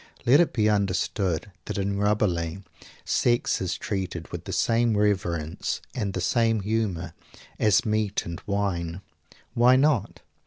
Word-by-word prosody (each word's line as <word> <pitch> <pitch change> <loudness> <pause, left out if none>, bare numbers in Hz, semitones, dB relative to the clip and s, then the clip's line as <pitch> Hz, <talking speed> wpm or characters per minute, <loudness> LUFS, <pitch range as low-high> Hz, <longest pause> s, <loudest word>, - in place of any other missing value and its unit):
Let 130 +5 +6
it 175 - +3
be 110 -3 +1
understood 100 -2 0
that - - -4
in 100 0 -1
Rabelais 100 -4 0 0.4
sex 120 -1 +1
is 95 - -2
treated 95 -5 -4
with - - -6
the - - -5
same 115 -1 +2
reverence, 85 -6 -1
and 105 -6 -2
the 95 - -2
same 115 +2 +2
humor, 95 -6 -2 0.5
as 105 -3 +3
meat 105 -2 0
and 85 -1 -6
wine. 95 -4 -2 0.5
Why 125 +2 +5
not? 135 -5 +1
100 Hz, 140 wpm, -26 LUFS, 90-110 Hz, 0.5 s, Let